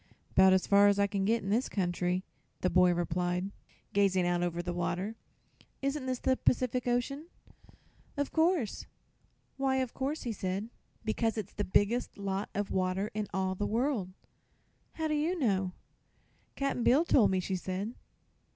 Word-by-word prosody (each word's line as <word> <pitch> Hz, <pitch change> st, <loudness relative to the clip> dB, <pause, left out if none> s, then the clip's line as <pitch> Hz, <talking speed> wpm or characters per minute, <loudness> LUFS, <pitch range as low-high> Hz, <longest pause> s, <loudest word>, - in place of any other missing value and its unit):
"'Bout 190 Hz, 0 st, +7 dB
as 190 Hz, -1 st, +3 dB
far 200 Hz, 0 st, +6 dB
as 200 Hz, 0 st, +4 dB
I 200 Hz, -, +4 dB
can 200 Hz, -1 st, -1 dB
get, 225 Hz, +2 st, +1 dB
in 195 Hz, -, -2 dB
this 235 Hz, +5 st, +1 dB
country," 180 Hz, -1 st, -1 dB, 0.4 s
the 180 Hz, -, +1 dB
boy 180 Hz, -1 st, +5 dB
replied, 175 Hz, +2 st, -1 dB, 0.4 s
gazing 195 Hz, -3 st, +3 dB
out 175 Hz, 0 st, +1 dB
over 175 Hz, 0 st, -1 dB
the 175 Hz, 0 st, -3 dB
water. 180 Hz, +5 st, -2 dB, 0.7 s
"Isn't 275 Hz, -1 st, -1 dB
this 255 Hz, -1 st, 0 dB
the 260 Hz, +1 st, +1 dB
Pacific 250 Hz, 0 st, +1 dB
Ocean?" 275 Hz, +6 st, -1 dB, 0.9 s
"Of 285 Hz, -1 st, -1 dB
course." 320 Hz, -, +1 dB, 0.7 s
"Why 270 Hz, -1 st, +1 dB
of 260 Hz, -2 st, -1 dB
course?" 280 Hz, +4 st, -3 dB
he 240 Hz, -, -2 dB
asked. 195 Hz, +1 st, -3 dB, 0.4 s
"Because 225 Hz, +1 st, 0 dB
it's 210 Hz, -2 st, -4 dB
the 205 Hz, -, -2 dB
biggest 205 Hz, +5 st, +1 dB
lot 195 Hz, 0 st, -3 dB
of 205 Hz, 0 st, -2 dB
water 185 Hz, +2 st, 0 dB
in 210 Hz, -1 st, -2 dB
all 190 Hz, 0 st, 0 dB
the 205 Hz, +2 st, -2 dB
world." 235 Hz, -4 st, 0 dB, 0.8 s
"How 320 Hz, -1 st, -2 dB
do 305 Hz, -, 0 dB
you 315 Hz, +5 st, 0 dB
know?" 195 Hz, -, +1 dB, 0.8 s
"Cap'n 275 Hz, -3 st, -1 dB
Bill 280 Hz, +9 st, +5 dB
told 245 Hz, -10 st, +5 dB
me," 190 Hz, -, +1 dB
she 190 Hz, +1 st, -2 dB
said. 190 Hz, +5 st, -3 dB
205 Hz, 165 wpm, -31 LUFS, 185-255 Hz, 0.9 s, Bout